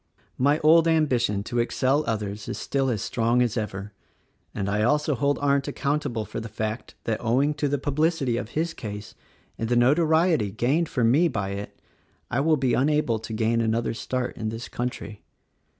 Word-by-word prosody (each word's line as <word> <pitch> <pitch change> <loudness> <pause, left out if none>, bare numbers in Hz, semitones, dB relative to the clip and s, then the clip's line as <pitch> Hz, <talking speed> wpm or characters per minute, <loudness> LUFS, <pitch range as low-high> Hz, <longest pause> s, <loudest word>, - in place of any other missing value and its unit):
"My 145 +3 +4
old 165 +2 +6
ambition 125 -11 +2
to 120 +3 -2
excel 130 +5 +1
others 105 -2 -3
is - - -4
still 135 -1 -1
as 110 -6 -1
strong 120 +1 +2
as 120 -2 -1
ever, 105 -2 -4 0.6
and 100 - -3
I 105 +1 0
also 150 +6 +2
hold 140 +3 +1
Arndt 140 -1 +1
accountable 140 -6 -2
for 110 - -6
the 115 0 -7
fact 110 +2 -4
that, 110 0 -2
owing 130 +6 +2
to 150 0 -1
the 145 +1 0
publicity 145 -2 0
of 115 -2 -4
his 165 +1 0
case, 105 -1 -7 0.5
and 115 - -2
the 120 - +2
notoriety 155 - +3
gained 135 - 0
for 125 - 0
me 140 +10 +4
by 100 -10 -2
it, 100 +1 -6 0.5
I 120 - +1
will 155 +2 +3
be 130 -3 +1
unable 140 -4 +2
to 110 - -8
gain 115 +1 +1
another 115 +1 0
start 125 +3 -3
in 110 - -2
this 115 +2 -6
country. 120 -4 -5
120 Hz, 180 wpm, -25 LUFS, 110-145 Hz, 0.6 s, old